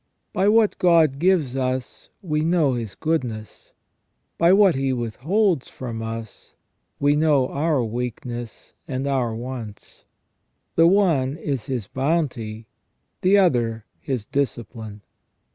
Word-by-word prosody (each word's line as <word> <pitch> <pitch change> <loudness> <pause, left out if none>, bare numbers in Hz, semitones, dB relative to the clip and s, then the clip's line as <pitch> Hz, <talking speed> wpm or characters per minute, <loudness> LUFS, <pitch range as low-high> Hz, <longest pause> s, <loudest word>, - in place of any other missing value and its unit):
By 190 - +2
what 220 -1 +3
God 165 -6 +4
gives 165 -7 +2
us 130 -1 -3
we 150 -4 0
know 160 -4 +2
His 115 -4 -4
goodness; 125 -10 -3 0.7
by 170 +1 +5
what 195 -2 +6
He 135 0 0
withholds 140 - 0
from 115 -3 -6
us 115 -1 -7 0.4
we 145 +1 +3
know 150 -4 +3
our 145 -3 0
weakness 120 0 -5
and 130 -1 -3
our 130 -5 0
wants: 115 -3 -8 0.7
the 165 - +6
one 165 -8 +2
is 140 -8 -3
His 125 -6 -2
bounty, 130 - -2 0.6
the 195 +1 +5
other 120 - +2
His 130 -8 -3
discipline. 115 -6 -4
135 Hz, 120 wpm, -23 LUFS, 120-165 Hz, 0.7 s, what